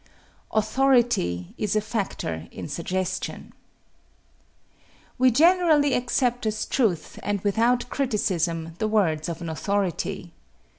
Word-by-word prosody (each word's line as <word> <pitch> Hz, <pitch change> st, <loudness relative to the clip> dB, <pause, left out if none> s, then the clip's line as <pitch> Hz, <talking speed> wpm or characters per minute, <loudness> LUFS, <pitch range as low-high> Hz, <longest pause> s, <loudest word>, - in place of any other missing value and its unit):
Authority 220 Hz, -, +1 dB
is 210 Hz, -1 st, 0 dB
a -, -, +4 dB
factor 195 Hz, -, -3 dB
in -, -, -7 dB
suggestion. 185 Hz, +4 st, -3 dB, 1.7 s
We 255 Hz, 0 st, +6 dB
generally 310 Hz, 0 st, +4 dB
accept 245 Hz, -1 st, 0 dB
as 215 Hz, 0 st, -1 dB
truth, 210 Hz, -, -1 dB
and 205 Hz, 0 st, -1 dB
without 230 Hz, +5 st, +2 dB
criticism, 175 Hz, -, -1 dB
the 215 Hz, -, +1 dB
words 175 Hz, -8 st, +1 dB
of 170 Hz, 0 st, -5 dB
an 165 Hz, -, -4 dB
authority. 190 Hz, 0 st, -2 dB
210 Hz, 105 wpm, -25 LUFS, 170-245 Hz, 1.7 s, We